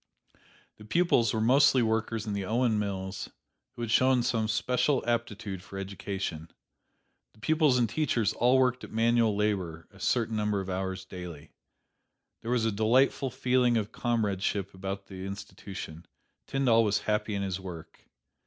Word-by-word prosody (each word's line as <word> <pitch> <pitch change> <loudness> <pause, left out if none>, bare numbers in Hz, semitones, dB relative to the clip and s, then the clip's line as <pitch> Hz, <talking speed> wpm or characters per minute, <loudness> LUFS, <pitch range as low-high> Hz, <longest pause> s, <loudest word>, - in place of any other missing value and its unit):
The 105 - -13
pupils 120 -4 +3
were 110 - -1
mostly 130 +2 +5
workers 110 0 -1
in 105 - -3
the 100 -1 -2
Owen 115 +1 +1
mills 95 -2 -4 0.5
who 120 - -5
had 115 - -3
shown 130 0 +4
some 110 -2 0
special 125 +5 +1
aptitude 110 -5 -2
for 95 +1 -10
education. 95 -4 -5 0.9
The - - -21
pupils 155 0 +3
and 120 -2 +3
teachers 115 -4 0
all 125 +3 +3
worked 125 -1 +2
at - - -9
manual 115 -1 +3
labor 95 -6 -1
a - - -17
certain 115 -2 0
number 105 -1 0
of 95 0 -4
hours 95 0 -3
daily. 85 -5 -9 0.9
There 115 - -6
was 120 -2 +2
a 110 - +2
delightful 125 +6 +2
feeling 125 -1 +2
of 105 -1 -2
comradeship 100 -4 -1
about 95 +1 -5
the 95 -1 -8
institution. 95 -4 -8 0.4
Tyndall 125 -4 +3
was 105 -2 +1
happy 105 0 -1
in 100 - -1
his 95 -1 -2
work. 90 -4 -10
110 Hz, 155 wpm, -29 LUFS, 95-120 Hz, 0.9 s, mostly